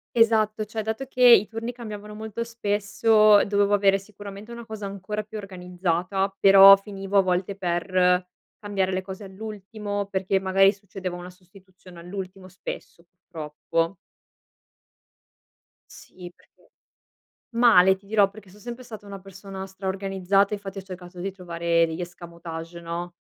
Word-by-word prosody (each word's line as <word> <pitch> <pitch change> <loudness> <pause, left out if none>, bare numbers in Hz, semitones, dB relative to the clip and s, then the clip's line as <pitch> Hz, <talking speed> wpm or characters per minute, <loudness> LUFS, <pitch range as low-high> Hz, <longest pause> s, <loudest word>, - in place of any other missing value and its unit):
Esatto, 220 -2 +3
cioè 220 +1 -4
dato 220 +5 -3
che 255 -1 -1
i 235 -4 +8
turni 225 +2 -5
cambiavano 210 -3 -8
molto 220 +1 -5
spesso, 215 -1 +3
dovevo 205 0 +2
avere 195 -1 +4
sicuramente 200 +2 -11
una 235 0 -8
cosa 220 -2 -7
ancora 200 +2 -5
più 215 +1 -9
organizzata, 185 0 -2
però 195 0 +9
finivo 195 0 -4
a - - +7
volte 185 +1 -1
per 180 0 +1 0.3
cambiare 195 -2 -1
le 185 0 -1
cose 190 +2 -9
all'ultimo 205 0 -6
perché, 190 0 0
magari, 195 +1 +4
succedeva 190 -2 -7
una 175 0 -8
sostituzione 185 -1 -17
all'ultimo, 185 +1 -8
spesso 175 -2 -9
purtroppo. 165 0 -4 1.9
Sì, 180 -1 -12
perché - - -29 0.8
male 220 -6 +6
ti 195 +1 -22
dirò, 205 -1 +3
perché 205 -1 -15
so 200 +3 -17
sempre 240 +3 -8
stata 220 -4 -10
una 200 -1 -8
persona 195 0 -9
straorganizzata, 195 +1 0
infatti 200 -1 -6
ho - - -7
cercato 180 -1 -10
di 195 +2 -3
trovare 170 -2 0
degli 160 +2 -5
escamotage, 170 -1 -8
no, 170 +1 -5
195 Hz, 140 wpm, -25 LUFS, 180-210 Hz, 1.9 s, però